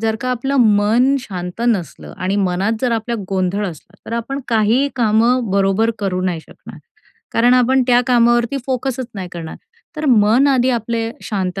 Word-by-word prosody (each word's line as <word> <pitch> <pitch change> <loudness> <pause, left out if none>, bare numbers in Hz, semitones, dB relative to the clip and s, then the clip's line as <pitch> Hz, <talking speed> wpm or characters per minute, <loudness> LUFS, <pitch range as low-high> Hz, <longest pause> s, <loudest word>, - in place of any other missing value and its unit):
जर 220 0 0
का 255 - -2
आपलं 270 +3 -1 0.2
मन 230 +7 +3
शांत 180 -2 -7
नसलं 190 -8 -3
आणि 190 +2 -2
मनात 195 +2 0
जर 250 -2 0
आपला 230 +1 -2
गोंधळ 195 +1 -1
असला 175 +4 -13
तर - - -7
आपण 270 +4 -4
काही 230 +5 +2
कामं 230 +1 +2
बरोबर 195 +3 +2
करू 190 -3 -2
नाही 175 -3 -2
शकणार. - - -14 0.5
कारण 245 +2 +4
आपण 255 +1 +3
त्या 245 -1 +4
कामावरती 240 +1 +2
फोकसच 260 -1 -2
नाही 185 -3 -6
करणार. 165 -2 -7 0.4
तर 305 - -4
मन 230 +4 +4
आधी 260 -1 +2
आपले 230 -1 -2
शांत 195 -2 -3
225 Hz, 165 wpm, -18 LUFS, 195-245 Hz, 0.5 s, कारण